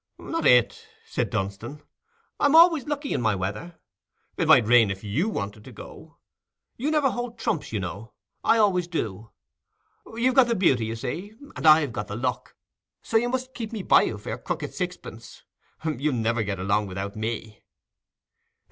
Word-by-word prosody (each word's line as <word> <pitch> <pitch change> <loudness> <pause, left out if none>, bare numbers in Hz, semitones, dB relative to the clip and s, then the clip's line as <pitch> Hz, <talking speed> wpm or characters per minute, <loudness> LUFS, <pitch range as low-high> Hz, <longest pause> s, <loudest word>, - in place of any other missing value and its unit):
"Not 330 - -2
it," 125 -3 +3 0.2
said - - -2
Dunstan. 105 +10 -5 0.6
"I'm 285 +2 +3
always 330 -4 +6
lucky 290 -1 -3
in - - -1
my 110 -3 +1
weather. 105 - -5 0.6
It - - -1
might 120 - +6
rain 115 -2 +5
if 95 +1 -5
you 140 - -1
wanted 105 - -5
to - - -11
go - - -11
yourself. - - -18 0.6
You 275 +6 -1
never 300 -3 +2
hold 240 -1 -5
trumps, 165 - -2
you 110 - -2
know—I 100 - -3
always 185 -5 +2
do. 110 - -4 0.9
You've 250 +3 +2
got 260 -2 +5
the 235 - 0
beauty, 135 - +2
you 115 - -4
see, 175 - -5 0.2
and 140 +4 -1
I've 155 -3 +6
got 105 - -4
the 105 - -6
luck, 125 +2 -3 0.5
so - - -6
you 235 +2 +3
must 260 +1 -3
keep 225 -4 -6
me 215 -4 -5
by - - +5
you 110 - -2
for 100 - -9
your - - -4
crooked - - -4
sixpence; - - -7 0.4
you'll 150 -2 -1
ne 115 -1 +1
ver 120 -1 -1
get 100 -2 -3
along 100 +3 0
without 95 +2 -5
me." 110 0 -5
130 Hz, 180 wpm, -25 LUFS, -, 0.9 s, always